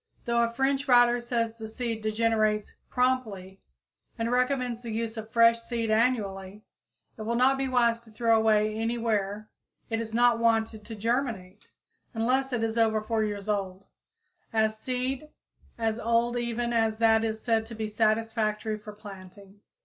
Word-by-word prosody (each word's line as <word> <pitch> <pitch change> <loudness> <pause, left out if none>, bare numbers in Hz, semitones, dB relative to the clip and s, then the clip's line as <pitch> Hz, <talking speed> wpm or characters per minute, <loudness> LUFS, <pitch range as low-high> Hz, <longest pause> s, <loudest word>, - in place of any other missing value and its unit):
Though 235 0 +2
a 235 - +2
French 270 +3 0
writer 245 -1 +5
says 235 -1 -1
the 225 -1 -8
seed 230 0 -4
degenerates 215 -1 0 0.2
"promptly," 220 -7 -1 0.6
and 230 0 -1
recommends 250 -1 0
the 235 - -7
use 225 0 -3
of 220 -1 -7
fresh 230 0 +5
seed 230 -1 -3
annually, 210 -4 0 0.5
it - - -8
will 230 +2 -2
not 255 +3 +4
be 270 0 -2
wise 235 -2 +2
to 235 -1 -19
throw 230 +1 +2
away 215 -1 +3
any 225 +2 -2
where 215 -2 -1 0.4
it 225 0 0
is 225 -1 -6
not 240 0 +3
wanted 225 -2 +1
to 225 0 -7
germinate, 220 -4 -3 0.5
unless 260 +4 +1
it 240 -2 -1
is 225 +1 -1
over 220 -1 +3
four 220 0 -1
years 205 -1 -4
old, 195 -2 -2 0.7
as 220 -1 +1
seed 255 +4 -3 0.5
as 225 -1 -1
old 235 +1 +1
even 240 0 -2
as 225 -1 +1
that 225 -1 +4
is 220 -1 -2
said 225 -2 +1
to 230 - -8
be 220 0 -3
satisfactory 215 0 0
for 210 0 -10
planting. 200 -1 -13
225 Hz, 165 wpm, -27 LUFS, 215-235 Hz, 0.7 s, writer